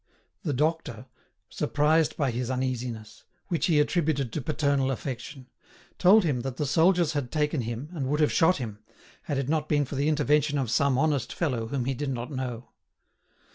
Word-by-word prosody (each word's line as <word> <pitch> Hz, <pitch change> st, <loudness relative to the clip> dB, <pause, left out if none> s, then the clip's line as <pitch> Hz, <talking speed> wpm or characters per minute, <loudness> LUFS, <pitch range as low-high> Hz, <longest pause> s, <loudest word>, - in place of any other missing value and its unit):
The 165 Hz, -, -2 dB
doctor, 140 Hz, -5 st, -1 dB, 0.4 s
surprised 155 Hz, +2 st, +1 dB
by 140 Hz, -4 st, +1 dB
his 120 Hz, +1 st, -3 dB
uneasiness, 120 Hz, -4 st, -4 dB, 0.3 s
which 170 Hz, -3 st, 0 dB
he 160 Hz, -4 st, +3 dB
attributed 150 Hz, -5 st, 0 dB
to 155 Hz, -, -2 dB
paternal 140 Hz, -1 st, 0 dB
affection, 130 Hz, 0 st, -5 dB, 0.5 s
told 195 Hz, +4 st, +6 dB
him 145 Hz, -7 st, 0 dB
that 130 Hz, 0 st, -5 dB
the 150 Hz, -, -1 dB
soldiers 165 Hz, +2 st, +3 dB
had 140 Hz, -5 st, -3 dB
taken 150 Hz, -2 st, 0 dB
him 120 Hz, +4 st, -5 dB
and 145 Hz, -7 st, -3 dB
would 150 Hz, +3 st, 0 dB
have 150 Hz, -, +3 dB
shot 180 Hz, +1 st, +4 dB
him, 110 Hz, -6 st, -6 dB, 0.4 s
had 145 Hz, -5 st, -3 dB
it 135 Hz, -2 st, -1 dB
not 155 Hz, 0 st, -1 dB
been 145 Hz, -1 st, +2 dB
for 140 Hz, -, -9 dB
the 140 Hz, +2 st, +1 dB
intervention 150 Hz, 0 st, +2 dB
of 130 Hz, -5 st, -1 dB
some 140 Hz, 0 st, +2 dB
honest 150 Hz, -2 st, +1 dB
fellow 125 Hz, -9 st, -2 dB
whom 130 Hz, -1 st, -2 dB
he 135 Hz, -, 0 dB
did 140 Hz, +2 st, -3 dB
not 125 Hz, +1 st, -4 dB
know. 125 Hz, -3 st, -5 dB
140 Hz, 180 wpm, -27 LUFS, 125-155 Hz, 0.5 s, told